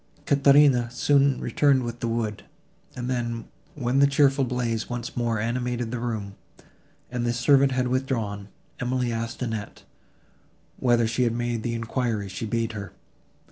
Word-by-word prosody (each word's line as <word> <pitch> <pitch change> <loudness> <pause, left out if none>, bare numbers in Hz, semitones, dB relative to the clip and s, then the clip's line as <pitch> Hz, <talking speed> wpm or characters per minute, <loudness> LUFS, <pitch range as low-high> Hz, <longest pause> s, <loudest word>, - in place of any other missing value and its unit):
Caterina 140 -3 +5
soon 140 +2 +2
returned 140 -3 +2
with 120 0 -5
the 115 - -2
wood, 115 -2 -2 0.5
and 125 -1 -4
then, 120 -2 -2 0.3
when 130 -1 0
the 140 - +6
cheerful 140 0 +3
blaze 120 -3 -2
once 120 -1 -5
more 115 -2 0
animated 120 +1 -2
the 125 - -3
room, 110 -4 -3 0.8
and 125 -1 -2
this 120 0 0
servant 135 +1 +4
had 125 -1 +1
withdrawn, 115 -6 -2 0.3
Emily 125 -1 -1
asked 115 +2 -4
Annette, 110 -3 -5 0.9
whether 120 -2 +3
she 115 +3 -1
had 120 -2 +2
made 120 -1 -2
the 115 0 -2
enquiry 115 -3 -2
she 95 +4 -5
bade 115 +1 -1
her. 100 -2 -7
120 Hz, 150 wpm, -25 LUFS, 115-130 Hz, 0.9 s, the